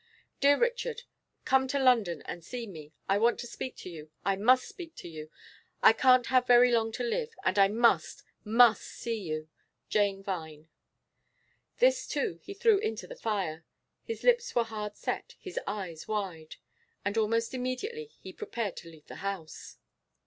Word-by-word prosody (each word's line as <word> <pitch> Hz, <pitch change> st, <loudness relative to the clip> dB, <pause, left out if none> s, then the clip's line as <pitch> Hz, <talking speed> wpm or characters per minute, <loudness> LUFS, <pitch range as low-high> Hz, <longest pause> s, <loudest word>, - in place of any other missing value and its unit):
'Dear 285 Hz, +1 st, +5 dB
Richard, 485 Hz, 0 st, -1 dB, 0.4 s
come 265 Hz, 0 st, +3 dB
to 280 Hz, -, -1 dB
London 230 Hz, -, +3 dB
and 175 Hz, -, -6 dB
see 240 Hz, +6 st, -5 dB
me. 155 Hz, -7 st, -10 dB, 0.2 s
I 195 Hz, +1 st, +2 dB
want 235 Hz, +2 st, +3 dB
to -, -, -6 dB
speak 250 Hz, +2 st, -6 dB
to -, -, -9 dB
you, 155 Hz, -2 st, -10 dB, 0.2 s
I 195 Hz, -, +2 dB
must 250 Hz, +6 st, +4 dB
speak 335 Hz, -4 st, -10 dB
to -, -, -9 dB
you. 155 Hz, -2 st, -8 dB, 0.5 s
I -, -, +9 dB
can't 255 Hz, +1 st, +5 dB
have 255 Hz, -1 st, +2 dB
very 245 Hz, 0 st, +7 dB
long 225 Hz, -1 st, +2 dB
to 250 Hz, -, -3 dB
live, 455 Hz, -, -2 dB
and -, -, +2 dB
I 195 Hz, -, +7 dB
must, 230 Hz, +3 st, +2 dB, 0.2 s
must 225 Hz, 0 st, +5 dB
see 230 Hz, -2 st, -5 dB
you. 155 Hz, -3 st, -4 dB, 0.4 s
'JANE 200 Hz, -2 st, +1 dB
VINE.' 160 Hz, -5 st, -6 dB, 1.1 s
This -, -, +3 dB
too 260 Hz, -, -2 dB
he 395 Hz, -, -9 dB
threw 425 Hz, 0 st, +4 dB
into 440 Hz, +2 st, -3 dB
the -, -, -9 dB
fire. 190 Hz, -, -2 dB, 0.4 s
His 455 Hz, -, -6 dB
lips 485 Hz, 0 st, +3 dB
were 240 Hz, -, +4 dB
hard 210 Hz, -2 st, -6 dB
set, -, -, -4 dB
his 375 Hz, -, -5 dB
eyes 190 Hz, -6 st, -5 dB
wide. 190 Hz, -7 st, -4 dB, 0.5 s
And 200 Hz, +1 st, -1 dB
almost 230 Hz, +2 st, +1 dB
immediately 260 Hz, -, -3 dB, 0.2 s
he -, -, -9 dB
prepared 230 Hz, -, -4 dB
to 170 Hz, -, -9 dB
leave 160 Hz, -2 st, -16 dB
the -, -, -10 dB
house. 195 Hz, -5 st, -6 dB
225 Hz, 170 wpm, -30 LUFS, 195-265 Hz, 1.1 s, I